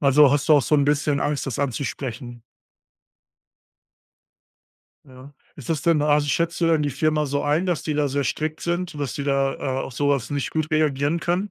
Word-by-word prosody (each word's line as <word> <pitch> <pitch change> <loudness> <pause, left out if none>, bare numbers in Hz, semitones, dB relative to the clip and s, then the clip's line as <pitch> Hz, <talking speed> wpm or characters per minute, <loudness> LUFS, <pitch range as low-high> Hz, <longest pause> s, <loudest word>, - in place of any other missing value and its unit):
Also, 140 0 +5
hast 145 +2 0
du 155 - +7
auch 145 - +4
so 150 - +1
'n 140 -1 +3
bisschen 145 0 +1
Angst, 145 -2 -1
das 130 - -4
anzusprechen? 125 -2 -4 2.6
Ja. 130 +1 -14 0.2
Ist 140 - -11
das 155 -3 -1
denn 160 -3 +2
also, 150 0 +2
schätzt 170 +3 -1
du 170 - +3
denn 160 -2 +2
die 145 - -1
Firma 150 +2 0
so 140 +1 -1
ein, 150 +5 +1
dass 175 -4 -1
die 155 - -2
da 145 -1 +1
sehr 140 +1 -1
strikt 155 +3 -3
sind, 175 -2 -3
dass 140 -7 -3
die 140 - -4
da, 135 -1 +1
äh, - - -12 0.3
auf - - -8
so 145 +3 0
was 140 -3 0
nicht 140 -2 -2
gut 155 0 -2
reagieren 155 +1 +1
können? 180 +5 -1
145 Hz, 205 wpm, -23 LUFS, 140-155 Hz, 2.6 s, du